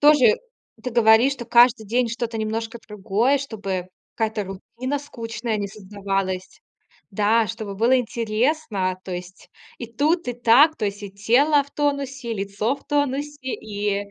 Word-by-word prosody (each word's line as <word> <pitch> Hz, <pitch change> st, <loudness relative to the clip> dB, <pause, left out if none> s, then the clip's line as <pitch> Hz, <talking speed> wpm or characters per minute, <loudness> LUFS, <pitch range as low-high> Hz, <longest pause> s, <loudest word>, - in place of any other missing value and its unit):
тоже 290 Hz, -7 st, +6 dB, 0.5 s
ты 250 Hz, -, -3 dB
говоришь, 230 Hz, +3 st, +5 dB
что 240 Hz, -, -8 dB
каждый 240 Hz, -1 st, +5 dB
день 240 Hz, +3 st, +1 dB
что-то 230 Hz, 0 st, -3 dB
немножко 225 Hz, +1 st, -3 dB
другое, 215 Hz, +7 st, +1 dB
чтобы 200 Hz, -8 st, -4 dB, 0.3 s
какая-то 220 Hz, -2 st, -1 dB
рутина 235 Hz, +8 st, -5 dB
скучная 230 Hz, -5 st, -4 dB
не 200 Hz, -1 st, -3 dB
создавалась. 195 Hz, -2 st, -4 dB, 0.5 s
Да, 215 Hz, +3 st, +3 dB
чтобы 200 Hz, 0 st, -6 dB
было 235 Hz, +5 st, +4 dB
интересно. 225 Hz, -4 st, -1 dB
То 185 Hz, -, -6 dB
есть 180 Hz, +1 st, -8 dB, 0.3 s
и 240 Hz, -, -5 dB
тут 300 Hz, +9 st, 0 dB
и 245 Hz, -, -1 dB
так. 245 Hz, +7 st, +5 dB
То -, -, -3 dB
есть 200 Hz, +1 st, -5 dB
и 200 Hz, -, -7 dB
тело 265 Hz, +9 st, +3 dB
в 280 Hz, -, -18 dB
тонусе, 275 Hz, -4 st, -2 dB
и -, -, -2 dB
лицо 200 Hz, +5 st, -1 dB
в -, -, -17 dB
тонусе, 290 Hz, 0 st, -1 dB, 0.2 s
и 205 Hz, -1 st, -3 dB
225 Hz, 155 wpm, -23 LUFS, 205-260 Hz, 0.5 s, тоже